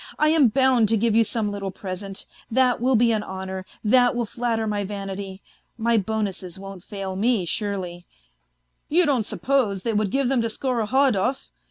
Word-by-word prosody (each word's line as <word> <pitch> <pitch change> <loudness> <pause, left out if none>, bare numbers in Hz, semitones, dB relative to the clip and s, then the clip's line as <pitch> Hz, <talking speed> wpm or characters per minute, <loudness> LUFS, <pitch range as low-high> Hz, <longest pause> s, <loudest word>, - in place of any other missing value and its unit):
I 305 - +4
am 310 -4 +5
bound 250 -2 +3
to 225 - +3
give 225 +1 +1
you 230 - +6
some 215 -1 -2
little 200 -1 -4
present, 190 +1 -6 0.2
that 250 0 +2
will 255 +1 +3
be 235 +1 +4
an 215 -2 +1
honour, 190 -1 -6 0.2
that 245 +3 +4
will 240 -1 0
flatter 230 0 -2
my 205 -1 -1
vanity.... 195 -1 -6 0.3
My 235 0 +1
bonuses 195 -4 -3
won't 195 -2 -9
fail 195 -2 -5
me, 215 -1 +1
surely; 180 -2 -3 0.8
you 345 +3 +4
don't 260 -8 +1
suppose 230 -9 0
they 230 - -1
would 210 -1 +1
give 270 +4 +1
them 260 -2 +2
to 230 - 0
Skorohodov? 255 0 0
215 Hz, 175 wpm, -24 LUFS, 195-245 Hz, 0.8 s, you